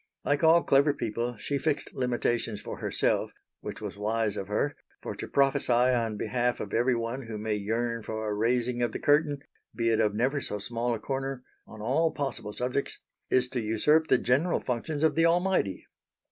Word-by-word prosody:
Like 145 +1 +1
all 165 +1 +6
clever 140 +1 +4
people 115 +1 -3
she 140 +6 -2
fixed 150 0 -1
limitations 120 -3 -1
for - - -7
herself; - - 0 0.3
which - - -7
was 100 - -6
wise 110 0 0
of 100 - -4
her, 110 +8 0 0.3
for - - -4
to - - -6
prophesy 140 -1 +2
on 120 -3 +2
behalf 125 +2 0
of 100 - -6
every 120 +2 +3
one 115 +2 -4
who 110 -1 -5
may 110 +1 -2
yearn 115 +3 -1
for 110 0 -4
a 105 - -1
raising 120 +3 0
of 120 -2 0
the - - -3
curtain, 145 -1 +2 0.3
be 115 -1 +1
it 110 - +2
of 105 -2 +2
never 135 +6 +1
so 105 - -4
small 115 +3 -2
a - - -6
corner, 135 +1 -3 0.2
on 110 -1 -10
all 160 +8 +2
possible 135 -7 -3
subjects, 125 +5 -2 0.3
is 125 -1 +3
to 125 -2 -2
usurp 150 +9 +2
the 130 - +5
general 140 +9 +1
functions 145 +5 -3
of 160 -2 +4
the 165 +1 +4
Almighty. 175 - +1
120 Hz, 190 wpm, -28 LUFS, 110-140 Hz, 0.3 s, all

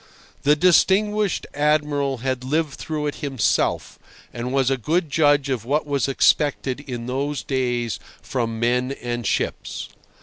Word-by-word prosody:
The 145 +1 +4
distinguished 195 +4 +3
Admiral 145 -2 +1
had 130 -1 -1
lived 150 +2 0
through 155 0 -4
it 145 - -2
himself, 135 -7 0 0.3
and 120 +1 -4
was 135 -1 +2
a - - +3
good 160 - 0
judge 145 -1 +3
of 130 -6 -2
what 145 +6 0
was 140 -2 0
expected 140 -1 +2
in 125 -5 -6
those 140 +3 -2
days 120 -3 -1 0.2
from 115 -3 -3
men 125 +3 +1
and 120 -4 -4
ships. - - -2
140 Hz, 140 wpm, -22 LUFS, 125-150 Hz, 0.3 s, The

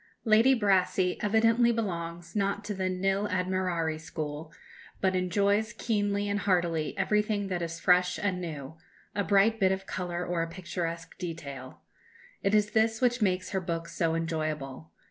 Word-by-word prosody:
Lady 225 +4 +6
Brassey 185 -2 +2
evidently 230 +3 +4
belongs 170 -6 -4
not 200 0 0
to 210 - -3
the 190 -1 -1
nil 195 +2 0
admirari 180 -4 -1
school, 155 0 -6 0.5
but 190 -1 +1
enjoys 200 +4 +1
keenly 205 -2 0
and 205 0 0
heartily 175 -5 0
everything 210 -1 +1
that 180 -2 -2
is 170 0 -4
fresh 180 0 +3
and 185 -3 -1
new 160 -2 -7 0.3
a 205 - 0
bright 205 +3 +3
bit 190 -2 +4
of 190 0 -2
colour 180 -2 -3
or 175 -1 -1
a 165 - -2
picturesque 170 -2 -5
detail. 140 -7 -7 0.6
It 200 +2 +2
is 210 0 +2
this 220 0 +2
which 245 -1 +2
makes 185 -2 +1
her 190 -2 0
book 170 -1 -3
so 165 -1 0
enjoyable. 155 -3 -3
185 Hz, 155 wpm, -29 LUFS, 165-205 Hz, 0.6 s, Lady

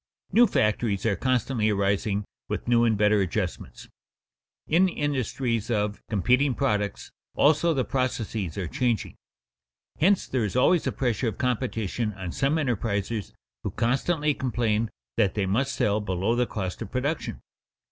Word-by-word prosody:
_ - - -27
New 240 +1 +7
factories 105 - 0
are 105 -3 +2
constantly 125 -3 +1
arising 100 0 0 0.2
with - - -3
new 120 -1 +4
and 110 -2 +2
better 105 0 +4
adjustments. 90 -5 -3 0.8
In 180 +4 +3
industries 130 - -1
of 105 -2 -1
competing 125 +6 +2
products, 105 -7 -1 0.2
also, 155 +3 +4
the 130 - +1
processes 115 - -2
are 95 -3 -2
changing. 125 -5 -1 0.9
Hence 190 +5 +3
there 130 -3 -1
is 105 - -3
always 165 +7 +3
a - - +1
pressure 120 -2 -1
of 110 - -3
competition 115 -3 -1
on 95 -3 -6
some 135 - +1
enterprisers 110 -7 -1 0.3
who - - -3
constantly 145 +6 +1
complain 115 -4 0 0.3
that 100 - +2
they 100 -2 +1
must 125 +9 0
sell 105 +1 +1
below 95 +3 0
the 125 0 +1
cost 95 -4 -4
of - - -5
production. 145 +5 -2
115 Hz, 145 wpm, -26 LUFS, 105-130 Hz, 0.9 s, New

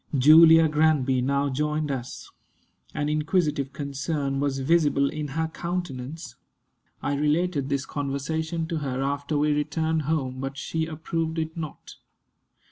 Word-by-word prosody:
Julia 160 +4 +8
Granby 150 -4 +2
now 140 +2 +1
joined 150 +2 -1
us. 130 -2 -6 0.6
An 150 -1 -1
inquisitive 150 -2 0
concern 140 0 -3
was 140 -1 0
visible 145 0 +2
in 155 -1 -4
her 160 +4 -2
countenance. 160 -3 -5 0.7
I 145 - 0
related 150 0 0
this 140 -1 -1
conversation 160 +4 -3
to 165 - -1
her 135 -2 -2
after 140 +2 -1
we 150 +1 +2
returned 160 +2 0
home; 130 -5 -1
but 135 +1 -5
she 160 +3 -2
approved 160 +1 -3
it 160 0 -3
not. 155 -4 -8
150 Hz, 130 wpm, -25 LUFS, 140-160 Hz, 0.7 s, Julia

